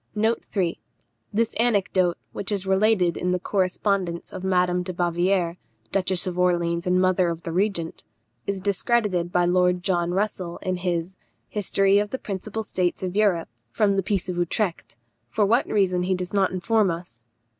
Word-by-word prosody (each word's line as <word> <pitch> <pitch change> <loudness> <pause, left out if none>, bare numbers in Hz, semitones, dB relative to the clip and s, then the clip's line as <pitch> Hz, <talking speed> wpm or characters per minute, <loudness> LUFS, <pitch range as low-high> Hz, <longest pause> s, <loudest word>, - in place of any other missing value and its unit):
This 225 +2 0
anecdote, 195 -6 +2 0.2
which 200 - -4
is 195 -2 0
related 190 -3 +3
in 180 - -2
the 180 0 +1
correspondence 185 -2 -1
of 185 - -6
Madame 180 -1 +2
de 180 +1 -4
Bavière, 175 0 +1 0.3
Duchess 185 -2 +1
of 180 -1 -3
Orleans 170 -1 +1
and 180 0 +3
mother 185 -1 +3
of 170 0 -5
the 165 - -4
Regent, 180 -2 -1 0.4
is 200 -1 -1
discredited 200 -2 0
by 175 0 +3
Lord 180 0 +2
John 175 -2 +1
Russell 185 -3 -2
in 185 -2 -1
his 180 0 -2 0.3
History 195 -1 +2
of 205 0 -1
the 260 - -3
principal 215 0 -5
States 185 -3 -1
of 185 0 -3
Europe 200 -6 +2 0.2
from 200 - +2
the 195 - +2
Peace 195 -1 -1
of 180 -1 -3
Utrecht; 175 - -1 0.3
for 210 -2 +2
what 235 +6 +2
reason 185 -4 +2
he 185 +1 +1
does 180 +1 -5
not 195 -2 +3
inform 195 +3 +1
us. 165 -9 -6
185 Hz, 165 wpm, -24 LUFS, 175-200 Hz, 0.4 s, related